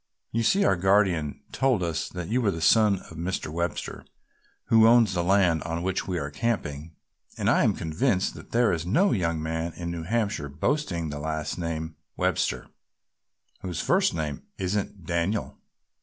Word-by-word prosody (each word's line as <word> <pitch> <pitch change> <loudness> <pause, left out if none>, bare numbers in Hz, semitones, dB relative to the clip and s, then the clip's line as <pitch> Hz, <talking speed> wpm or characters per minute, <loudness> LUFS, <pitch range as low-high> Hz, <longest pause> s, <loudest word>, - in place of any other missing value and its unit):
"You 115 - 0
see 195 - +3
our 95 - +4
guardian 95 -5 +2
told 130 -8 +1
us 80 -2 -2
that 90 -2 -6
you 125 +4 +1
were 110 - +2
the 80 - -2
son 105 +5 +5
of - - -15
the 85 - -11
Mr. 85 -2 -3
Webster 85 0 -3 0.6
who 110 -1 +6
owns 115 -4 +5
the 85 -1 0
land 90 -4 +3
on 85 +2 -3
which 95 0 -1
we 90 -2 -1
are 70 -3 -3
camping, 80 -6 -3 0.4
and - - -1
I - - +4
am - - +2
convinced 90 - 0
that - - -12
there 115 -4 +3
is 80 -2 -2
no 170 - +2
young 85 -5 0
man 80 +1 -3
in 85 -1 -5
New 85 -1 -4
Hampshire 100 -5 -1
boasting 85 - -1
the 75 - -5
last 80 +2 -3
name, 80 -1 -4 0.2
Webster, - - 0 0.9
whose 90 -4 -5
first - - +2
name 75 -3 -3 0.2
isn't 95 -1 -3
Daniel! 85 +6 -1
85 Hz, 175 wpm, -26 LUFS, 80-105 Hz, 0.9 s, who